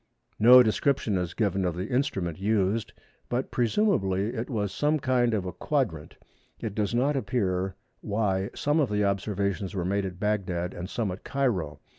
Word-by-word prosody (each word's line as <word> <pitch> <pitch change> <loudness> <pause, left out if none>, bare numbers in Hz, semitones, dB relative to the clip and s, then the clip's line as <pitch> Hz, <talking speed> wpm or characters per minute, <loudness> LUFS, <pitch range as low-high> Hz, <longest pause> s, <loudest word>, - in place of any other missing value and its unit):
No 125 +3 +9
description 110 -1 +1
is 90 -2 -2
given 100 -3 0
of 90 -2 -1
the 95 +4 -4
instrument 95 - -1
used, 105 +1 0 0.4
but 125 +2 -2
presumably 115 - +1
it 120 0 -4
was 105 -6 -1
some 150 +9 +1
kind 125 -3 +2
of 100 -3 -2
a 90 - -3
quadrant. 115 - -2 0.4
It 110 - -4
does 105 +2 -1
not 140 +4 +2
appear 95 -8 -1 0.2
why 100 -2 -1
some 145 +2 +1
of 140 -7 +2
the 105 0 +1
observations 100 0 -1
were 90 -2 -1
made 100 +1 0
at 90 -1 -9
Bagdad 95 -4 -1
and 90 +2 -6
some 110 -4 -2
at 90 - -8
Cairo. 95 - -1
105 Hz, 170 wpm, -27 LUFS, 95-120 Hz, 0.4 s, No